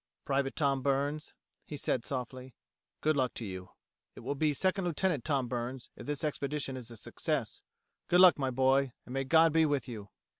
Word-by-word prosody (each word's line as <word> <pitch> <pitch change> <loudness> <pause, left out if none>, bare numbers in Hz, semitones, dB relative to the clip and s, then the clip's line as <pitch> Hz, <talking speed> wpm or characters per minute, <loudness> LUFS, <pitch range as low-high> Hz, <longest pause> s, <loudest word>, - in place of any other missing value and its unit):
"Private 135 -1 0
Tom 140 -3 +1
Burns," 140 +3 -1 0.3
he 150 - -7
said 125 -3 -1
softly. 130 -1 -5 0.5
"Good 155 0 +2
luck 130 -3 0
to 115 - -5
you. 95 -2 -7 0.5
It - - -10
will 135 +4 -2
be 150 +2 +1
Second 185 +5 +1
Lieutenant 170 -5 0
Tom 140 -5 0
Burns 120 +1 -4
if 120 - -10
this 145 -1 -2
expedition 145 -2 -2
is 125 -2 -8
a 115 - -10
success. - - -3 0.5
Good 180 - +4
luck, 180 -4 +8
my 135 -1 0
boy, 130 0 +2
and 125 - -9
may 135 0 -1
God 160 +2 +5
be 160 0 +5
with 145 -3 -1
you." 105 -5 -7
135 Hz, 190 wpm, -31 LUFS, 125-150 Hz, 0.5 s, luck